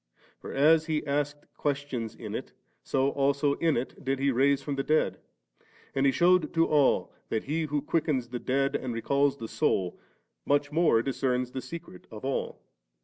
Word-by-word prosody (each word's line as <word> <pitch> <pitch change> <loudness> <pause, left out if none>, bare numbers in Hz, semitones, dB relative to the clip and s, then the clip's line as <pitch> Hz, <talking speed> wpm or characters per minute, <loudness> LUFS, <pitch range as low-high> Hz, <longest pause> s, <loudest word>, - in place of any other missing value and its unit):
For - - -8
as 155 +3 +4
He 155 -2 -1
asked 145 +1 -2
questions 140 -6 -2
in - - -7
it, - - -5 0.3
so 135 +1 +1
also 140 +1 +2
in 165 -3 +2
it 125 +4 -5
did 135 0 0
He 140 +1 +2
raise 135 +2 +2
the 140 -2 -1
dead; 155 +2 +1 0.7
and 135 +1 +2
He - - +5
shewed 175 +1 +3
to 165 0 +4
all 145 -3 +2 0.2
that 110 - -1
He 155 +3 -1
who 145 -1 -2
quickens 150 -6 0
the 120 0 -4
dead 135 +3 0
and 125 -3 -3
recalls 140 +4 +1
the 115 - -6
soul, 95 - 0 0.4
modi 145 0 +1
more 155 -8 +3
discerns 125 -2 -1
the 130 - -4
secret 165 - -9
of 110 +2 -8
all. 135 - -3
140 Hz, 175 wpm, -28 LUFS, 130-150 Hz, 0.7 s, He